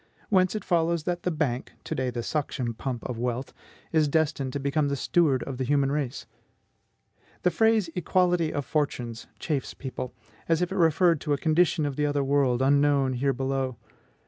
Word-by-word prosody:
Whence 185 -1 +3
it 215 - -4
follows 170 -2 +1
that 175 +1 -2
the - - 0
Bank, 150 -7 -2
to - - -4
day 130 -1 -1
the 120 -1 -4
suction 135 -5 -2
pump 120 +1 -4
of 120 -3 -5
wealth, 125 +2 -3 0.4
is 155 -2 +3
destined 145 -3 0
to 140 - -2
become 140 +2 +1
the 140 - 0
steward 140 -1 +2
of 135 -2 -6
the - - 0
human 140 +1 +2
race. 145 -3 -2 1.2
The 180 - +3
phrase 220 +1 +3
EQUALITY 180 -2 +1
OF 145 -2 -3
FORTUNES 125 -7 -2
chafes 145 -4 -3
people, 130 -2 -6 0.3
as 165 -1 +3
if 180 0 -1
it - - -3
referred 165 -1 +3
to 150 - 0
a - - +1
condition 160 +1 +2
of 140 -2 -3
the 150 0 +1
other 145 -1 0
world, 135 -2 +2
unknown 140 -1 +3
here 135 +3 +1
below. 135 -1 -2
145 Hz, 185 wpm, -27 LUFS, 130-165 Hz, 1.2 s, Whence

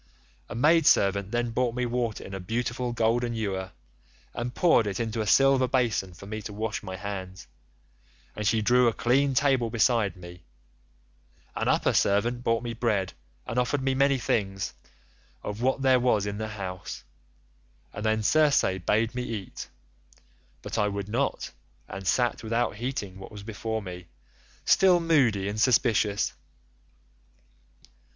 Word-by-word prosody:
A - - -6
maid 160 +6 +4
servant 100 0 +3
then 120 +1 -1
brought 120 0 0
me 125 0 -1
water 120 -2 -2
in 95 - -9
a 95 - -4
beautiful 120 +5 -2
golden 120 +1 0
ewer 95 -4 -3 0.6
and 120 +1 -4
poured 160 -11 +4
it 95 -2 -3
into 115 -1 -2
a 105 - -3
silver 135 +3 +4
basin 115 -8 0
for 100 - -12
me 110 +2 -5
to 105 - -7
wash 110 +1 -3
my 95 -3 -6
hands, 95 -2 -6 0.9
and 105 -1 -2
she 110 0 +2
drew 125 +2 +4
a 115 - +2
clean 130 +5 +2
table 130 -4 +2
beside 115 -2 +2
me; 90 -1 -12 1.1
an - - -2
upper - - +2
servant 120 +5 +1
brought 115 0 +1
me 120 -1 -4
bread 105 -5 -1 0.3
and 120 - -1
offered 130 +2 0
me 135 0 +1
many 140 +1 +3
things 95 -6 -1 0.7
of 105 +2 -5
what 130 +2 +1
there 130 -1 +5
was 120 -5 +2
in 100 0 -4
the 110 - -3
house, 95 -4 -6 0.9
and 105 - -6
then 110 0 +1
Circe 150 +4 +4 0.2
bade 110 +6 +1
me 125 - -3
eat, 110 -6 -6 0.9
but - - -3
I 105 - +2
would 100 0 -4
not, 130 +5 -1 0.4
and 95 -1 -7
sat 120 +3 +1
without 115 -1 -1
heeding 105 -6 -4
what 95 - -10
was 105 -2 -9
before 110 0 -4
me, 90 -2 -8 0.6
still 185 -2 +5
moody 130 - +2
and 105 +1 -2
suspicious. 110 -4 +2
115 Hz, 155 wpm, -27 LUFS, 100-125 Hz, 1.1 s, there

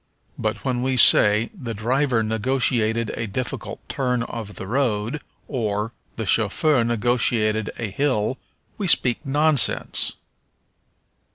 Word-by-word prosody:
But 110 +1 -3
when 125 -2 -1
we 130 0 0
say, 105 -1 +5
"The 125 - -6
driver 120 +2 0
negotiated 115 0 0
a 115 - -4
difficult 125 +5 -5
turn 125 -3 -1
of 110 -4 -7
the - - -7
road," 120 +3 -1 0.3
or, 110 -3 -2 0.2
"The 110 - -4
chauffeur 115 +7 +2
negotiated 115 -2 +1
a 110 -4 -4
hill," 130 -1 0 0.4
we 200 - -1
speak 125 -5 +3
nonsense. 145 -1 +2
115 Hz, 115 wpm, -22 LUFS, 110-130 Hz, 0.4 s, say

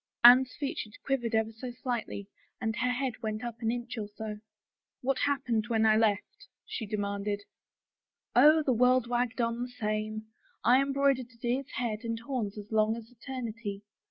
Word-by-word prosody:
" - - -63
Anne's 250 +1 +8
features 250 -7 -4
quivered 240 -5 0
ever 220 0 +1
so 225 +3 -7
slightly 240 -5 -4 0.3
and 220 -1 -1
her 250 - +1
head 250 -1 -2
went 215 0 -3
up 235 -1 -5
an 225 - +1
inch 240 0 -3
or 210 - -3
so. 210 0 -6 0.3
" - - -63
What 270 +1 +1
happened 250 -7 +1
when 220 -1 +2
I 215 0 +6
left? 225 - 0
" - - -62
she 220 - -5
demanded. 205 0 -2 0.5
" - - -51
Oh, 305 +5 +7
the 265 - +2
world 250 +1 +4
wagged 245 0 0
on 230 0 0
the 250 - -3
same. 215 -2 -3 0.4
I 250 +4 +6
embroidered 275 -2 +2
a 230 - -21
deer's 245 +3 -1
head 230 -3 -1
and 230 -1 -2
horns 230 -4 -3
as 210 +1 -9
long 220 0 +3
as 230 0 -10
eternity. 230 -5 -6
235 Hz, 185 wpm, -30 LUFS, 215-250 Hz, 0.5 s, Anne's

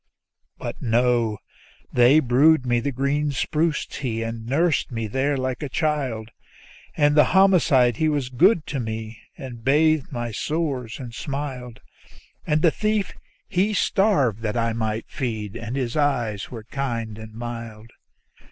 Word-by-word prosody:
But - - -6
no; 120 -2 +2 0.6
they 125 +5 +6
brewed 135 +2 +4
me 120 -1 +2
the 140 +4 -2
green 140 +3 0
spruce 155 +3 0
tea, 115 -5 -4
and 115 0 -5
nursed 155 +2 +1
me 115 -2 -3
there 135 +6 0
like 130 -1 -3
a 145 - -4
child; 130 -8 -1 0.7
And 145 0 +3
the 150 - +6
homicide 145 - +4
he 155 - +2
was 145 -4 -1
good 165 - +3
to 140 - -4
me, 110 -1 -5 0.2
and 125 -6 -9
bathed 155 +2 +3
my 120 -3 -3
sores 135 -3 -2
and 120 -3 -8
smiled; 130 -2 -5 0.7
And 155 0 +1
the 165 - +6
thief 215 0 -1 0.3
he 200 +4 +1
starved 185 - +2
that 110 +1 -2
I 115 -1 +1
might 110 -1 -2
be 110 -5 -2
fed, - - -15
and 115 +2 -5
his 130 -2 -2
eyes 120 -9 0
were 115 -3 -8
kind 115 -4 -4
and 110 0 -10
mild. 115 -1 -7
125 Hz, 150 wpm, -23 LUFS, 115-150 Hz, 0.7 s, they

